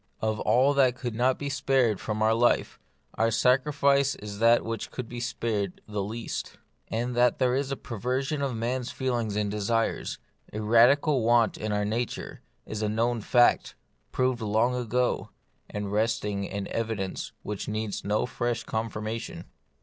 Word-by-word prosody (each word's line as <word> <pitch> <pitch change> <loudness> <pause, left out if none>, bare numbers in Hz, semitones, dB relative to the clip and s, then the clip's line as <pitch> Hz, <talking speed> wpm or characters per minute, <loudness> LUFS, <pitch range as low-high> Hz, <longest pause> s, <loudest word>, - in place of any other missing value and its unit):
Of 110 -1 -1
all 135 +4 +3
that 130 -3 +4
could 125 -2 -4
not 125 +3 +2
be 145 - -4
spared 135 -6 +1
from 110 0 -2
our 110 +1 +4
life, 120 +2 +2 0.3
our 115 - +2
sacrifice 140 +3 +3
is 105 -1 -8
that 115 +1 +5
which 115 -1 -4
could 125 -3 -6
be 120 +1 -6
spared 110 -5 -2
the 105 -1 -3
least. 110 +4 -5 0.3
And 120 +2 -2
that 120 0 +3
there 125 -1 +2
is 135 +1 -1
a - - 0
perversion 130 +6 -2
of 135 -4 -1
man's 120 +2 -2
feelings 120 -5 -2
and 105 -1 0
desires, 110 +2 -1 0.3
a 105 - -4
radical 125 +6 +4
want 115 0 +3
in 110 0 -3
our 105 0 0
na 115 +4 +1
ture, - - -8 0.2
is 110 0 -5
a 105 - 0
known 115 +2 0
fact, 120 +3 +3 0.4
proved 130 -2 0
long 110 +3 +2
ago, 125 0 0 0.4
and 105 -1 -4
resting 105 -2 -1
on 100 -1 -3
evidence 110 -4 -3
which 105 -1 -5
needs 110 -1 -3
no 105 +3 +1
fresh 120 -1 -2
con 110 +1 -2
firmation. 110 +2 -5
115 Hz, 165 wpm, -27 LUFS, 110-125 Hz, 0.4 s, that